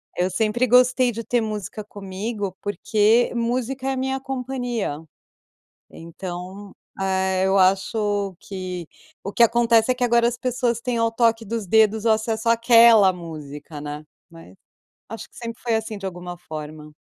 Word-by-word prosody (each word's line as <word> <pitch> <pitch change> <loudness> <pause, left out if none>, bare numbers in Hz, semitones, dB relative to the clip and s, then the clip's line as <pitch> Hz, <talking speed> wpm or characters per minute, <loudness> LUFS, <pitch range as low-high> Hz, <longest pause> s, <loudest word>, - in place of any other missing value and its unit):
Eu 180 +1 0
sempre 220 +5 +1
gostei 250 +1 +4
de 230 0 -6
ter 240 -1 +1
música 215 -1 -5
comigo, 200 0 -5
porque 210 +3 +2
música 250 +3 -2
é - - +1
a 265 - -2
minha 265 +1 -1
companhia. 245 - -3 0.9
Então, 180 +3 -8 0.3
eh, 190 0 +1
eu 195 +1 +2
acho 195 +1 +1
que 185 -3 -6 0.4
o 200 - -5
que - - 0
acontece 235 0 +4
é - - 0
que 250 - -2
agora 235 -1 +3
as 240 0 -2
pessoas 245 -2 -1
têm 240 0 -2
ao 230 0 +1
toque 230 0 +2
dos 225 0 -4
dedos 220 +2 +3
o - - +4
acesso 220 +1 -1
aquela 230 -3 +6
música, 150 -4 -9
né. 150 +1 -6 0.3
Mas 165 - -14 0.5
acho 225 +1 -8
que - - -20
sempre 230 0 -7
foi 235 -2 +1
assim 220 -1 -3
de 195 - -8
alguma 175 -1 -6
forma. 155 -2 -9
220 Hz, 160 wpm, -22 LUFS, 185-235 Hz, 0.9 s, aquela